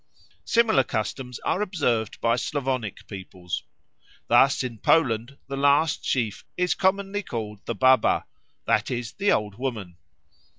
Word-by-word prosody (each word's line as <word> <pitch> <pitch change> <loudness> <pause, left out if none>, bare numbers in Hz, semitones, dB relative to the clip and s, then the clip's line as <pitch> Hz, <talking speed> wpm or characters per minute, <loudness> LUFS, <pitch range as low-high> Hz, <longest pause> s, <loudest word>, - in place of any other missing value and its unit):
Similar 230 - +4
customs 125 +2 -4
are 190 - 0
observed 140 - -1
by 115 0 +3
Slavonic 130 -5 -3
peoples. 95 -3 -6 0.7
Thus 135 +4 +5
in 120 -4 -5
Poland 130 -3 +2
the 140 - -4
last 145 +2 +3
sheaf 115 -6 -1
is 180 0 +2
commonly 195 +1 0
called 110 - -6
the 115 - -2
Baba, 130 -3 +4 0.4
that - - +1
is, 120 -1 -3
the 200 +1 +1
Old 105 0 -1
Woman. 110 -10 -4
125 Hz, 130 wpm, -25 LUFS, 110-145 Hz, 0.7 s, Thus